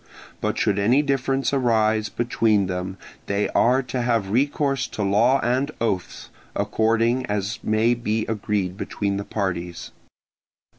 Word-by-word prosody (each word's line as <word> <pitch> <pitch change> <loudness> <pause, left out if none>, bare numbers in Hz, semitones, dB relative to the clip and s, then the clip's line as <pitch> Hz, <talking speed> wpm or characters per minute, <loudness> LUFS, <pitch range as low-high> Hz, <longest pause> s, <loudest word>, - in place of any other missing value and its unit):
But - - -1
should 100 -1 +1
any 120 +8 +3
difference 135 -1 0
arise 110 -4 +2
between 110 -4 +1
them 90 +1 -4 0.3
they 100 +1 0
are 130 +3 +3
to 125 0 -3
have 115 -5 0
recourse 140 +2 +1
to 105 - -4
law 115 +7 +3
and 130 +4 +1
oaths, 100 -6 -3 0.2
according 115 +3 +1
as 105 +2 -2
may 110 +2 +2
be 110 -2 -1
agreed 100 -4 -2
between 100 -1 -2
the 100 - -3
parties. 90 -4 -4
110 Hz, 135 wpm, -23 LUFS, 100-125 Hz, 0.3 s, any